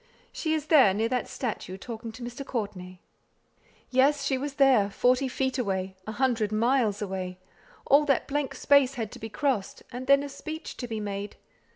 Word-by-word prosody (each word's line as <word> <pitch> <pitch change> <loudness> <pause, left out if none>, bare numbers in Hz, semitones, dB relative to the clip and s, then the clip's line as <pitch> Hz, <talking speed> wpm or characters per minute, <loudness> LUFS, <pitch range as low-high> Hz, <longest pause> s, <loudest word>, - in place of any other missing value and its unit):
She 315 -1 -1
is 305 -2 -3
there, 270 - +6
near 225 +2 0
that 250 0 -1
statue, 215 -6 -4
talking 225 +2 -7
to 240 +2 -9
Mr. 245 +3 -6
Courtenay." 195 -8 -5 0.9
Yes! 275 +2 +3
she 275 - +1
was 275 +2 -4
there 260 -8 +4
forty 250 +5 +2
feet 260 0 -1
away 190 -4 -2
a 220 - -4
hundred 235 -4 +1
miles 220 -2 +2
away! 185 -2 -4 0.5
All 290 +2 +5
that 275 -4 +1
blank 290 -1 -2
space 280 -2 +4
had 225 -4 -4
to - - -10
be 225 - -6
crossed; 250 -4 -1
and 250 +2 -6
then 275 0 +5
a 285 - -5
speech 310 +3 -7
to 245 - -5
be 225 -2 -4
made! 205 0 -5
245 Hz, 185 wpm, -27 LUFS, 210-275 Hz, 0.9 s, there